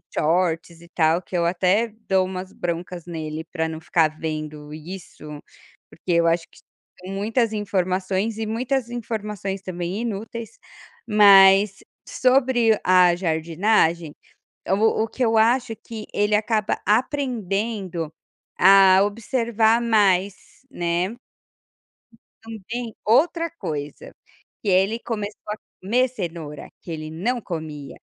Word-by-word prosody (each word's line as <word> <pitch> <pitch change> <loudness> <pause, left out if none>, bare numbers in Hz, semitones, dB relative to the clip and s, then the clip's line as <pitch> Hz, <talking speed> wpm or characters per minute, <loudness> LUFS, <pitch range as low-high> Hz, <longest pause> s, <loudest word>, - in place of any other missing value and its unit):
shorts 165 0 0
e 170 - -15
tal, 165 +1 +3
que 185 - -8
eu 170 - +1
até 185 +6 +2 0.2
dou 190 -1 +3
umas 185 0 -6
broncas 175 0 -5
nele 160 -2 -5
para 160 -2 -1
não 160 0 -6
ficar 160 -2 +1
vendo 155 -1 -5
isso, 155 -2 -9 0.5
porque 175 +2 -4
eu 170 0 +3
acho 165 0 +1
que - - -20 0.5
muitas 220 +4 0
informações 195 +1 -1
e 220 - -3
muitas 240 +3 -2
informações 210 -5 -4
também 185 +2 -4
inúteis, 225 +1 -6 0.5
mas 195 -2 +6 0.3
sobre 250 -4 +3
a 180 -1 +5
jardinagem, 165 -1 +1 0.6
o 215 +3 +2
o 225 - -5
que 255 - -5
eu 225 -1 +2
acho 230 0 +2
que 220 0 -9
ele 205 +1 +1
acaba 215 0 0
aprendendo 210 - -1 0.5
a 190 0 +7
observar 230 +1 +1
mais, 200 -4 +3 0.4
né. 175 -2 -1 1.3
Também 225 +1 -7
outra 330 +9 +3
coisa, 150 - -6 0.5
que 210 - -2
ele 195 +5 +2
começou 210 -3 -5
a 210 - -3 0.2
comer 245 +7 +2
cenoura 170 - -7
que 170 - -9
ele 155 -1 -5
não 225 +10 -2
comia. 155 -6 -7
195 Hz, 120 wpm, -23 LUFS, 170-225 Hz, 1.3 s, a